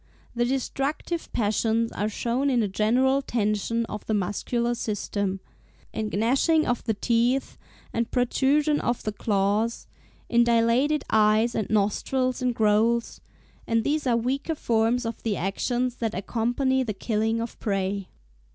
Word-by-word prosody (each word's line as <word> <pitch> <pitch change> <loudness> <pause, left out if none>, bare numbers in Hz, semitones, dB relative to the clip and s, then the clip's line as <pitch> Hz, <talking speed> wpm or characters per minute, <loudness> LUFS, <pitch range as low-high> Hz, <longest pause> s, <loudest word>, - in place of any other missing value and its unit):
The 240 0 +1
destructive 275 +6 -2
passions 225 +1 +1
are 210 +1 -2
shown 240 +6 -1
in 245 -4 +2
a - - 0
general 250 +7 +2
tension 230 -1 -1
of 210 -2 -7
the 220 - +1
muscular 235 +5 -1
system, 200 -3 -3 0.5
in 215 -1 -2
gnashing 270 - +2
of 245 - -1
the 220 -3 0
teeth 240 +5 +1 0.4
and 235 0 -1
protrusion 285 +4 +2
of 240 0 -1
the 215 - -2
claws, 205 +2 0 0.4
in 235 0 +4
dilated 235 +6 +2
eyes 220 +2 +4
and 215 - -2
nostrils 250 +5 0
in 250 -1 +1
growls; 225 +2 +1 0.5
and 230 -1 +1
these 295 +1 0
are 235 -2 +3
weaker 270 +7 -1
forms 230 -1 +1
of 230 - -4
the 215 -3 -1
actions 245 +6 -1
that 225 -2 -2
accompany 245 +7 0
the 220 -5 -3
killing 220 +2 0
of 230 +1 -5
prey." 195 -1 -2
230 Hz, 140 wpm, -25 LUFS, 215-250 Hz, 0.5 s, in